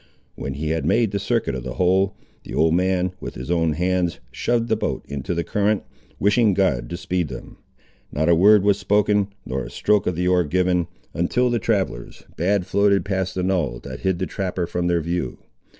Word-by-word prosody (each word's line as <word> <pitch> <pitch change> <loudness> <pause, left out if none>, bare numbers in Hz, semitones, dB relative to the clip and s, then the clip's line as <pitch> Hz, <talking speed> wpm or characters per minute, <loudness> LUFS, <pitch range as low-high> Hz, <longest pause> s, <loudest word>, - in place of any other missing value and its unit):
When 70 - -5
he 75 +2 -3
had 80 0 -1
made 115 -3 +2
the 100 - -1
circuit 100 - 0
of 65 - -4
the 65 0 -6
whole, 95 +3 +2 0.3
the - - -7
old 80 0 +3
man, 90 0 +1
with - - -7
his 65 +6 -5
own 80 -2 +2
hands, 90 +1 0
shoved 120 -1 0
the 110 - +2
boat 110 - -3
into 70 +4 -3
the 85 - 0
current, 105 +2 0 0.3
wishing 105 0 +3
God 65 -12 +1
to 85 - -4
speed 90 -1 -1
them. - - -9 0.5
Not 80 +3 0
a 85 - +6
word 100 +4 +6
was 100 -1 +3
spoken, 105 -1 +2 0.2
nor 65 0 -3
a - - -7
stroke 105 -1 +1
of 90 - 0
the 90 +2 0
oar 90 -1 +4
given, 90 +1 +1 0.3
until 120 +9 +1
the 120 - +1
travellers 95 - -2 0.2
had 95 +2 +1
floated 100 -1 +2
past 95 -2 -2
a 90 - 0
knoll 90 -10 0
that - - -7
hid 95 -2 0
the 95 - -1
trapper 95 -3 -3
from 90 +1 -2
their 85 -1 +2
view. 85 -5 -3
90 Hz, 205 wpm, -22 LUFS, 85-100 Hz, 0.5 s, a